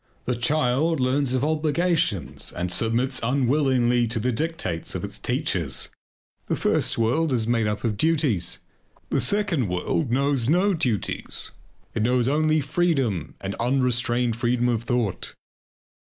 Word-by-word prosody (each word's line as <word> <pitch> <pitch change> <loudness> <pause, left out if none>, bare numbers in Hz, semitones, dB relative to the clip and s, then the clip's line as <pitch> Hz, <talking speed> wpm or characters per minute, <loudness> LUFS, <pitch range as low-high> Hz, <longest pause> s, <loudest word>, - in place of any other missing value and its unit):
The 125 - 0
child 145 +4 +1
learns 130 0 +1
of 130 - 0
obligations 155 - 0
and 90 0 -3
submits 120 +6 +1
unwillingly 125 -1 +2
to 115 0 -1
the 125 +4 0
dictates 120 - -3
of - - -4
its - - -6
teachers. - - -1 0.6
The - - 0
first - - +1
world 130 +8 +1
is 120 -4 +1
made 115 -2 +1
up 105 0 -3
of 110 -4 -1
duties. 145 - +1 0.5
The - - +2
second 200 - +1
world 90 - -1
knows 135 -1 +1
no 185 +5 +3
duties; 125 - -2 0.4
it - - -1
knows 125 +2 +2
only 155 +2 +2
freedom 140 - 0
and 95 0 -4
unrestrained 125 -1 +1
freedom 120 0 +1
of 115 -2 0
thought. 120 -6 -2
125 Hz, 135 wpm, -24 LUFS, 115-150 Hz, 0.6 s, no